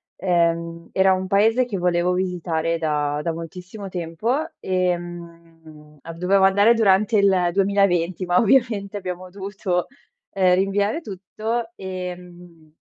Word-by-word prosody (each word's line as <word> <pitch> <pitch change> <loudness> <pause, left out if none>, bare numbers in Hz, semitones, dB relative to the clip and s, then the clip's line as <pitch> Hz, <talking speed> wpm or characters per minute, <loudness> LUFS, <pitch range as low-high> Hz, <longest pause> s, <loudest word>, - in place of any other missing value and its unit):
ehm, 170 -2 -1
era 190 0 +4
un 185 0 -2
paese 225 +6 +3
che 220 -5 -4
volevo 175 0 +1
visitare 170 -3 -1
da 150 -2 -1
da 165 +2 -2
moltissimo 180 +5 -8
tempo, 175 +6 -2 0.3
ehm, 170 -4 -5
ab 165 0 -9
dovevo 190 +2 +3
andare 200 +4 +5
durante 215 0 +3
il 190 -3 +3
2020, 190 -3 +1
ma 175 0 +2
ovviamente 220 -4 +2
abbiamo 185 -1 -6
dovuto 190 -1 -3 0.4
uhm, 185 -2 +2
rinviare 200 - 0
tutto 220 - -4
ehm, 180 -3 -9
180 Hz, 120 wpm, -22 LUFS, 170-200 Hz, 0.4 s, andare